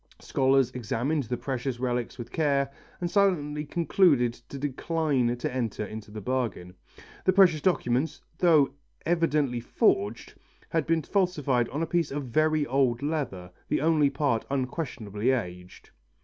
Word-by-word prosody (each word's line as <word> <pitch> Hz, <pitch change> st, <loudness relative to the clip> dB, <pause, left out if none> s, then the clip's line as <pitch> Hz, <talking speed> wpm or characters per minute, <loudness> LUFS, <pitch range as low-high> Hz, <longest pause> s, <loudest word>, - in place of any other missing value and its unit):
Scholars 135 Hz, -1 st, +2 dB
examined 130 Hz, +4 st, -1 dB
the 125 Hz, +2 st, -3 dB
precious 130 Hz, -1 st, -3 dB
relics 125 Hz, -2 st, -2 dB
with 120 Hz, -1 st, -8 dB
care 140 Hz, -3 st, +1 dB, 0.3 s
and 175 Hz, -1 st, -2 dB
silently 150 Hz, -7 st, +1 dB
concluded 150 Hz, -6 st, +3 dB
to 120 Hz, +4 st, -11 dB
decline 140 Hz, -3 st, 0 dB
to 130 Hz, +2 st, -3 dB
enter 115 Hz, -4 st, -2 dB
into 110 Hz, 0 st, -8 dB
the 105 Hz, +1 st, -7 dB
bargain. 110 Hz, -6 st, -2 dB, 0.5 s
The 185 Hz, -, +4 dB
precious 180 Hz, -5 st, +5 dB
document, 145 Hz, -4 st, +1 dB, 0.2 s
though 155 Hz, -6 st, +4 dB, 0.3 s
evidently 150 Hz, -7 st, +1 dB
forged, 105 Hz, -2 st, 0 dB, 0.4 s
had 165 Hz, -, 0 dB
been 165 Hz, -1 st, +2 dB
falsified 145 Hz, -, +1 dB
on 150 Hz, +4 st, -2 dB
a -, -, +1 dB
piece 165 Hz, -1 st, 0 dB
of 145 Hz, +1 st, -3 dB
very 155 Hz, +4 st, +2 dB
old 130 Hz, -2 st, +1 dB
leather, 130 Hz, -, -3 dB, 0.2 s
the -, -, +1 dB
only 155 Hz, -2 st, +3 dB
part 140 Hz, -5 st, 0 dB
unquestionably 125 Hz, -, -2 dB
aged. 90 Hz, -8 st, -4 dB
135 Hz, 140 wpm, -27 LUFS, 120-155 Hz, 0.5 s, precious